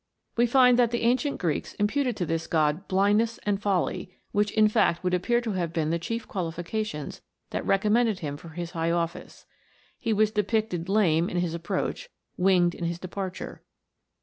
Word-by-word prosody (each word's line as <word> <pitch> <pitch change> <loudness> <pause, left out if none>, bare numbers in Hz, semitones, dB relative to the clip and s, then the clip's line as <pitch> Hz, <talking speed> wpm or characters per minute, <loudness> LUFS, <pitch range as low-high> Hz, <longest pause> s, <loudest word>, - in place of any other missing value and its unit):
We 240 +1 +3
find 250 0 +5
that 240 -2 +4
the 235 0 -2
ancient 255 +5 +1
Greeks 165 -5 -2
imputed 245 +3 0
to 175 - -1
this 165 0 -2
god 155 +3 +1
blindness 205 +4 +2
and 205 -1 0
folly, 185 -2 -1 0.2
which 205 0 +2
in 215 -1 +5
fact 210 -6 +2
would 180 0 0
appear 235 +7 +2
to 230 -2 -3
have 175 -4 -2
been 160 -2 -1
the 170 - 0
chief 230 +7 -4
qualifications 175 -1 -4 0.3
that - - -2
recommended 215 +2 +3
him 145 -5 -4
for 165 +3 -11
his 170 +1 -6
high 165 0 -1
office. 170 0 -3 0.5
He 230 - -1
was 215 0 +3
depicted 210 -4 -1
lame 175 -5 +3
in 180 - -3
his 175 -2 0
approach, 170 - -3 0.3
winged 180 -2 +3
in 170 - -5
his 170 0 -2
departure. 185 +1 -6
190 Hz, 175 wpm, -27 LUFS, 170-220 Hz, 0.5 s, find